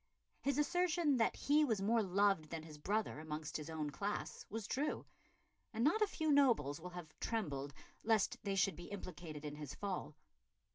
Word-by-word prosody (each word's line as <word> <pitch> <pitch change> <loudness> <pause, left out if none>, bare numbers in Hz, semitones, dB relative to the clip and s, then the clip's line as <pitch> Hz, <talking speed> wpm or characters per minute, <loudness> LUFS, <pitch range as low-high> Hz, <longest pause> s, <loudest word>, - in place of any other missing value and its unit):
His 280 0 +1
assertion 340 -2 +3
that 225 - +3
he 300 +2 +4
was 225 -8 +2
more 225 +4 +3
loved 195 -4 +2
than 165 -1 -4
his 155 -2 -10
brother 210 +1 0
amongst 155 -1 -4
his 155 0 -6
own 155 -2 -2
class 200 +8 -3
was 220 0 -4
true, 285 +7 -1 0.7
and 225 - +1
not 340 - +4
a 425 - +5
few 315 -5 0
nobles 230 - +4
will 180 - -6
have 175 -3 -8
trembled 145 -11 -2 0.3
lest 220 -3 +3
they 200 -2 0
should 195 0 +3
be 175 - -9
implicated 170 -6 -7
in 150 0 -5
his 150 -3 -6
fall. 190 -6 -3
195 Hz, 180 wpm, -38 LUFS, 155-235 Hz, 0.7 s, a